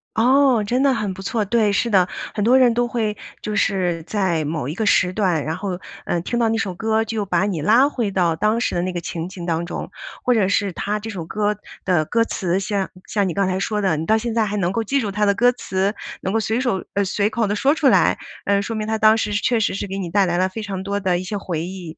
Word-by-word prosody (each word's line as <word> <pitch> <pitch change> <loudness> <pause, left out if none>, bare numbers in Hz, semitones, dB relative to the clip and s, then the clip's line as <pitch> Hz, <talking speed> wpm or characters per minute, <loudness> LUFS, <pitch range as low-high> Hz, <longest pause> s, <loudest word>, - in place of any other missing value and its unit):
哦， 255 0 +4
真 245 +6 0
的 275 -2 +4
很 210 -4 -2
不 190 - -9
错。 210 +1 -1
对， 215 -1 +2
是 235 +3 +1
的， 185 -4 +4 0.3
很 205 - -1
多 245 +4 +5
人 250 -3 +5
都 240 +1 +1
会 220 -3 -1 0.3
就 210 0 -3
是 180 -5 0
在 185 -5 0
某 150 -3 -3
一 150 - -3
个 220 - -2
时 185 -3 +3
段， 185 -7 +1
然 160 +1 -2
后， 185 -1 -4 0.3
呃， 175 - 0
听 240 +6 -2
到 230 -1 +2
那 225 - +1
首 200 -5 -2
歌 220 +3 0
就 215 -2 -2
把 180 0 +1
你 175 -7 -2
拉 235 - +5
回 235 -8 -2
到 175 -4 +1
当 215 +6 +1
时 240 - -1
的 175 - +1
那 185 - -2
个 175 - -3
情 170 +1 -5
景 180 -3 -8
当 170 0 -1
中。 - - -5 0.3
或 250 - +3
者 210 -5 +2
是 200 -1 0
它 210 +4 -2
这 225 +2 -7
首 180 -6 -5
歌 210 +4 -1 0.3
的 175 -5 +2
歌 230 +5 +2
词， 185 -4 -1
像 195 -1 -2 0.2
像 200 -3 0
你 - - -3
刚 195 -1 +1
才 185 0 -1
说 210 +1 -1
的， 185 -6 +1
你 160 - -3
到 220 +4 +3
现 230 0 -3
在 225 -2 +2
还 210 +1 -2
能 180 -2 0
够 225 +3 -1
记 275 +6 0
住 210 -5 -2
它 210 +1 +1
的 200 - +4
歌 245 +4 +4
词， 195 -4 -1 0.3
能 190 - -2
够 225 - +2
随 220 +3 -1
手 240 -8 -1
呃， 200 -1 +2
随 205 +2 0
口 225 -1 0
地 205 - 0
说 275 +7 +3
出 300 -4 +2
来， 195 -7 +4 0.3
呃， 200 0 +2
说 225 +2 -4
明 215 0 -3
它 220 - 0
当 215 0 +5
时 210 - -1
是 205 - 0
确 240 -3 +2
实 210 - +1
是 200 - -3
给 195 - -5
你 175 -3 -4
带 195 +2 +3
来 175 -1 0
了 185 +1 +2
非 220 +3 -6
常 195 -2 -4
多 200 +1 -2
的 185 -3 0
一 185 - -5
些 205 +2 -4
回 170 -5 -3
忆， 180 -3 -8
205 Hz, 300 characters per minute, -21 LUFS, 185-225 Hz, 0.3 s, 多